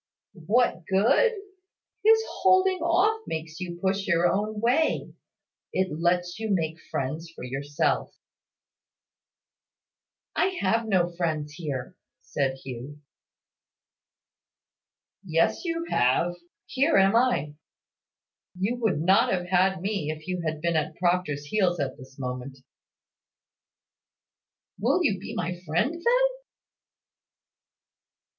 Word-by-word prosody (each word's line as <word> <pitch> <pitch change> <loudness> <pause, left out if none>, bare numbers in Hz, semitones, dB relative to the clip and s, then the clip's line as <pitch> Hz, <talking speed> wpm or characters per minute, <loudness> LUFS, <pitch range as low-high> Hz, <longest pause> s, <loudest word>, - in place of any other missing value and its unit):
"What 230 -5 +2
good? 230 - +4 0.7
His 445 +1 +6 0.2
holding 375 0 +4
off 365 +7 +2
makes 160 +1 -5
you 175 -2 -5
push 195 +1 -1
your 170 -2 +3
own 210 +4 -1
way. 250 +8 +1 0.6
It 185 0 0
lets 175 +2 0
you 220 -1 -3
make 165 -4 0
friends 155 +5 -3
for - - -9
yourself." 140 +3 -1 2.2
"I 375 0 +1
have 225 +4 +1
no 185 -4 +3
friends 155 -4 -2
here," 150 -1 -5 0.2
said 135 -2 -2
Hugh. 135 +3 -8 2.2
"Yes, 165 - +1
you 335 0 -2
have. 130 +8 +2 0.3
Here 275 +5 +2
am 195 +2 +5
I. 230 - +2 1.0
You 205 +7 -1
would 220 -10 0
not 190 +4 +4
have 180 -2 0
had 190 0 +2
me, 195 -7 -1
if 155 0 -6
you 180 -1 -2
had 155 -1 -3
been 170 0 0
at 155 0 -1
Proctor's 175 -5 0
heels 180 0 +1
at 135 -2 -2
this 130 +1 -14
moment." 125 0 -5 2.2
"Will 365 - +2
you 205 - +1
be 190 - -7
my 175 0 -3
friend, 175 - 0
then?" 480 +9 +3
180 Hz, 110 wpm, -26 LUFS, 155-225 Hz, 2.2 s, His